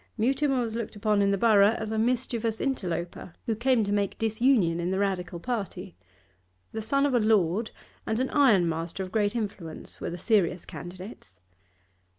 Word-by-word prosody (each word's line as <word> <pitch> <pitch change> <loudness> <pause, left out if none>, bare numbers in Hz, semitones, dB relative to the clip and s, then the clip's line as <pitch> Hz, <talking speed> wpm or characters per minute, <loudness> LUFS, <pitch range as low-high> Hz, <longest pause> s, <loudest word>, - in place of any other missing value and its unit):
Mutimer 270 +4 +1
was 230 -2 -3
looked 230 -1 -4
upon 210 0 +1
in 200 - +3
the 200 - +2
borough 210 0 +5
as 220 0 -4
a 220 - 0
mischievous 235 -1 0
interloper, 175 -9 -3
who 225 - 0
came 240 0 +2
to 200 - -2
make 200 -1 0
disunion 220 -6 +2
in 175 +1 -1
the 190 - 0
Radical 180 -3 -2
party. 195 -4 -4 0.8
The 220 - -4
son 275 +6 +1
of 285 - +1
a 245 - +4
lord 215 -1 +2 0.4
and 220 - 0
an 260 - -1
ironmaster 175 - +2
of 185 - -8
great 205 +1 +1
influence 195 -8 -6
were - - -3
the 175 - -5
serious 180 -3 +1
candidates. 180 - -10
210 Hz, 170 wpm, -27 LUFS, 185-235 Hz, 0.8 s, borough